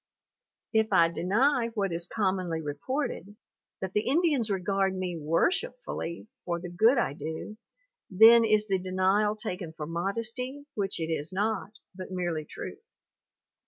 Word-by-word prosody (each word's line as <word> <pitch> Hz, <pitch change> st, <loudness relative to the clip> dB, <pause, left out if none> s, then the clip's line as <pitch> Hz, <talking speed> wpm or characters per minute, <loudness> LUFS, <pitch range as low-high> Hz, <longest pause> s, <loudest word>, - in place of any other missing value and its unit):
If 220 Hz, -1 st, +2 dB
I 170 Hz, -4 st, +5 dB
deny 230 Hz, -, +2 dB
what 200 Hz, -3 st, 0 dB
is 170 Hz, +1 st, -3 dB
commonly 185 Hz, -5 st, -1 dB
reported, 185 Hz, -, -4 dB, 0.5 s
that 190 Hz, -1 st, -4 dB
the 210 Hz, -, 0 dB
Indians 285 Hz, -5 st, +2 dB
regard 195 Hz, 0 st, 0 dB
me 180 Hz, -2 st, -3 dB
worshipfully 170 Hz, -, -1 dB, 0.2 s
for 170 Hz, -1 st, -2 dB
the 175 Hz, 0 st, -7 dB
good 220 Hz, +9 st, +4 dB
I 235 Hz, -, +1 dB
do, 160 Hz, +8 st, -6 dB, 0.5 s
then 225 Hz, +4 st, +8 dB
is 215 Hz, -1 st, +3 dB
the 190 Hz, -2 st, +1 dB
denial 190 Hz, +3 st, +1 dB
taken 180 Hz, -5 st, -5 dB
for 155 Hz, -2 st, -6 dB
modesty 230 Hz, -, -2 dB
which 195 Hz, -3 st, -2 dB
it 165 Hz, 0 st, -2 dB
is 155 Hz, +1 st, -3 dB
not, 210 Hz, +2 st, -1 dB, 0.2 s
but 185 Hz, 0 st, -8 dB
merely 175 Hz, -4 st, -2 dB
truth. -, -, -8 dB
190 Hz, 140 wpm, -28 LUFS, 170-220 Hz, 0.5 s, then